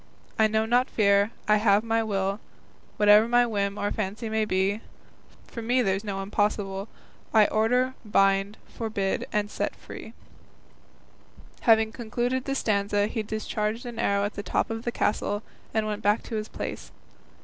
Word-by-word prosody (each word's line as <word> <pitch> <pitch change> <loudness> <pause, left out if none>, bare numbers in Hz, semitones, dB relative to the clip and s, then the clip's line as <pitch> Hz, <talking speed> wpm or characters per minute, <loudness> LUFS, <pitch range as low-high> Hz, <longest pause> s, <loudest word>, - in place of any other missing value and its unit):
I 220 - +6
know 220 0 +1
not 245 +3 +2
fear, 200 -1 +3 0.2
I 210 0 +5
have 210 0 +3
my 225 0 +1
will, 200 -2 -1 0.6
Whate'er 210 +1 +6
my 240 +1 +4
whim 200 -3 -1
or 205 0 -1
fancy 220 +2 -2
be; 195 +2 0 0.6
For 230 - -8
me 245 +3 +2
there's 195 0 0
no 195 -2 -3
impossible, 200 -1 -1 0.5
I 215 -1 +7
order, 250 +5 +2
bind, 195 -1 +2
forbid, 205 -4 -2 0.2
set 205 - -3
free. - - -10 1.6
Having 220 -1 +5
concluded 245 +3 -2
the 275 - -1
stanza 205 -3 +1
he 220 +1 -2
discharged 215 +1 -3
an 240 -2 -6
arrow 200 0 +1
at 205 - -3
the 205 - -5
top 200 - -1
of 225 +1 -5
the 240 - 0
castle, 205 -1 -1 0.3
and 220 -1 0
went 210 0 -3
back 210 +1 +2
to 230 - -6
his 215 0 -3
place. - - -6
215 Hz, 155 wpm, -26 LUFS, 200-225 Hz, 1.6 s, I